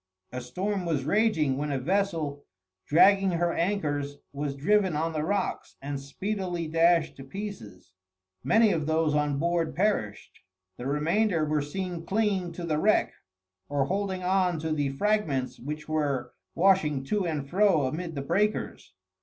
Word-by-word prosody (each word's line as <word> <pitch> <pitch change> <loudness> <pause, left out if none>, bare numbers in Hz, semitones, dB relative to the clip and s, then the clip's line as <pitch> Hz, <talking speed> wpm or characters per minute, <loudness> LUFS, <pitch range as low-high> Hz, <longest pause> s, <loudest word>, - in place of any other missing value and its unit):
A 125 - -5
storm 185 +10 -3
was 150 -5 0
raging 155 -8 +2
when 150 0 -2
a 140 - 0
vessel, 160 -2 -1 0.4
dragging 195 +4 +5
her 170 0 +1
anchors, 145 -6 -1 0.2
was 140 0 -3
driven 190 +4 +2
on 160 +2 -1
the 155 - -1
rocks 195 +3 -2
and 140 0 -4
speedily 175 +4 -3
dashed 165 +1 +3
to 135 - -9
pieces. 120 - -8 0.5
Many 220 -1 +4
of 155 -4 -1
those 160 -1 +2
on 150 -1 +1
board 170 +1 0
perished. 180 - -1 0.4
The 125 - -5
remainder 165 +4 +1
were 150 0 0
seen 175 +3 -4
clinging 195 -2 0
to 175 - -7
the 155 -3 0
wreck, 215 +5 +2 0.6
or 140 -1 +1
holding 190 +1 -2
on 180 -2 +2
to 160 0 -2
the 145 -3 0
fragments 145 -5 0
which 150 +4 -6
were 145 -5 -1 0.2
washing 165 -7 +3
to 195 +5 -1
and 150 -4 -3
fro 185 -3 +3
amid 165 +5 -4
the 140 - -3
breakers. 195 - -1
165 Hz, 155 wpm, -27 LUFS, 145-195 Hz, 0.6 s, dragging